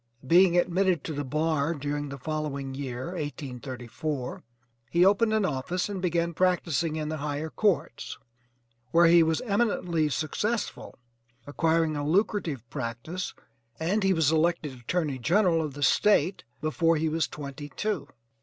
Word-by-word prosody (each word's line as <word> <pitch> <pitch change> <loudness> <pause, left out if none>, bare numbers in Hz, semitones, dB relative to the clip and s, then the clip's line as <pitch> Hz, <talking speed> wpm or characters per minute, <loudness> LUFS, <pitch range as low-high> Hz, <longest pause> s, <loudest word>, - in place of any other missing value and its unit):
Being 175 +4 +5
admitted 180 -2 +2
to 160 - -4
the 145 0 -3
bar 155 +2 0
during 145 0 -3
the 140 - -6
following 140 -1 -3
year, 130 0 -5
1834, 130 -4 -5 0.5
he 175 +6 +4
opened 205 +3 +4
an 215 -2 +2
office 180 +6 -2
and 195 -3 -4
began 170 -1 0
practicing 165 -3 +1
in 155 -1 -3
the 155 - -3
higher 150 +2 -3
courts 195 - 0 0.7
where 170 +6 +5
he 170 0 +7
was 160 -1 +2
eminently 200 -8 +1
successful, 205 +10 -2 0.5
acquiring 160 +2 +1
a 145 - -2
lucrative 160 - 0
practice, 135 +8 -4 0.4
and 185 +7 +1
HE 195 0 +4
WAS 160 -4 +3
ELECTED 160 -2 +1
ATTORNEY 135 +3 -2
GENERAL 170 - +3
OF 150 -3 -4
THE 145 - -3
STATE 190 +2 +3 0.2
BEFORE 165 +2 +2
HE 160 +1 0
WAS 160 -1 0
TWENTY 145 +1 -7
TWO. 200 -2 -2
160 Hz, 145 wpm, -27 LUFS, 145-180 Hz, 0.7 s, he